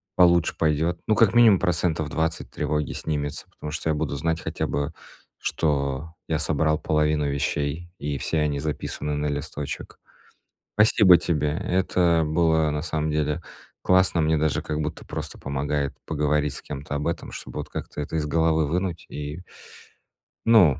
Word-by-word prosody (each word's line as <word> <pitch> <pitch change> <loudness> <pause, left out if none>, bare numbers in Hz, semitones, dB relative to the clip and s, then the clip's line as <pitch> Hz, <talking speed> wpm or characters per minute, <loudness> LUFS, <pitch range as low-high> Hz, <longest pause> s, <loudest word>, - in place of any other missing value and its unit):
получше 85 -2 +4
пойдет. 80 +2 +1
Ну, 110 - +4
как 115 -1 +4
минимум 110 -6 +7
процентов 80 -4 0
20 80 +1 -1
тревоги 75 -1 -1
снимется, 75 -2 -3
потому 75 - -7
что 80 0 -2
я - - +3
буду 70 - -2
знать 80 +3 0
хотя - - -2
бы, 70 0 -2 0.5
что 75 0 -1 0.2
я 80 -2 +1
собрал 75 0 +1
половину 75 -1 +1
вещей, 70 +4 -2
и 70 0 -2
все 80 - -1
они 75 -2 0
записаны 75 0 -3
на 75 0 -1
листочек. 70 0 -5 0.8
Спасибо 105 -3 +7
тебе. 75 -3 0
Это 85 -3 +2
было, 80 -1 +2
на 75 0 -2
самом 80 -2 -1
деле, 75 +2 0 0.4
классно. 90 -2 +4
Мне 80 0 +3
даже 75 -1 +1
как 75 0 -3
будто 75 +1 -5
просто - - -6
помогает 70 +1 -2
поговорить 75 -1 0
с - - -7
кем-то 75 0 -5
об 75 - -3
этом, 85 - -4
чтобы - - -6
как-то - - -6
это 75 - -4
из 75 -1 0
головы 80 0 +2
вынуть. 90 +2 -2
И 75 +4 -6 1.0
Ну. 100 - +6
75 Hz, 155 wpm, -25 LUFS, 75-85 Hz, 1.0 s, минимум